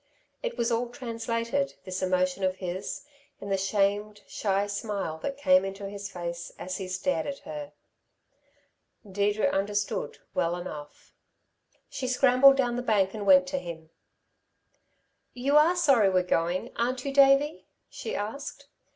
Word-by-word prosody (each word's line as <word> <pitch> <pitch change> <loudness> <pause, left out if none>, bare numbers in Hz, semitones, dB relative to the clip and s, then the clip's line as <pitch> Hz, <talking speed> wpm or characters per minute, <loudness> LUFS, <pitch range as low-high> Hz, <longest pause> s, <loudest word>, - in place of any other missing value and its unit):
It - - -4
was 235 0 0
all 235 +1 0
translated, 235 +2 -2
this 185 0 -4
emotion 185 0 0
of 185 0 +1
his, 185 +7 -5 0.3
in 200 - -7
the 195 - +2
shamed, 205 +2 0
shy 200 -1 0
smile 200 -5 -3
that 275 - -4
came 185 -8 +4
into 195 +1 -5
his 200 0 -6
face 170 -1 -6
as 185 0 -4
he 190 - -5
stared 185 +12 -1
at 280 -1 -4
her. 295 -1 -6 1.4
Deirdre 205 +2 0
understood 205 - -1 0.2
well 170 +1 0
enough. 150 -5 -9 0.7
She 260 - -4
scrambled 255 +1 +6
down 245 -3 +1
the - - -1
bank 205 -5 +2
and 210 -2 -5
went 275 -1 +7
to 275 -1 -1
him. 160 -5 -9 1.4
"You 270 +4 0
are 315 +4 +6
sorry 270 - +4
we're 185 -1 +2
going, 180 +6 -1
aren't 250 +2 -1
you, 275 - -2
Davey?" 275 +2 +4 0.2
she 450 - -6
asked. 280 +6 -6
210 Hz, 145 wpm, -28 LUFS, 185-270 Hz, 1.4 s, went